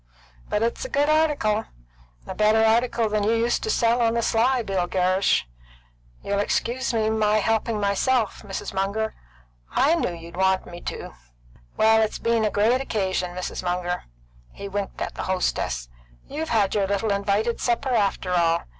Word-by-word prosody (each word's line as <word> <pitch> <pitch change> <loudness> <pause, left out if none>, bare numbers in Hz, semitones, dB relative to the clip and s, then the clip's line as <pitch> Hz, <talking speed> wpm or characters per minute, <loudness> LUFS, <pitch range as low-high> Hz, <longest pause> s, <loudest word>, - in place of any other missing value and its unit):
But 210 - 0
it's 235 - -1
a - - -5
good 290 -4 +1
article; 290 -9 +2 0.6
a - - -6
better 215 +1 +3
article 230 +1 +2
than 210 -1 0
you 215 +2 +2
used 230 +1 +1
to 440 - -3
sell 235 - +2
on 230 0 +2
the 235 - 0
sly, 245 +3 +2
Bill 190 -4 -1
Gerrish. 185 +1 +2 0.8
You'll 200 0 -1
excuse 240 +5 -1
my 220 -2 +2
helping 220 +1 0
myself, 210 +3 +1
Mrs. 195 -2 -6
Munger; 200 +3 -1 0.6
I 300 - +4
knew 330 - 0
you'd 170 +1 -11
want 190 0 +2
me 175 0 -10
to. - - -6 0.6
Well, 220 0 +5
it's 215 -1 0
been 230 -1 +1
a 215 - +2
great 225 +6 +2
occasion, 190 -7 -2
Mrs. 185 - -4
Munger." 180 0 -2 0.5
He 200 - -8
winked 200 0 -4
at - - -3
the - - -5
hostess. 60 - -1 0.4
"You've 315 +2 -4
had 210 -4 +2
your 200 -2 +1
little 200 +2 0
invited 200 +3 0
supper, 250 +2 0
after 195 -4 0
all. 170 -1 +2
215 Hz, 165 wpm, -24 LUFS, 195-235 Hz, 0.8 s, Well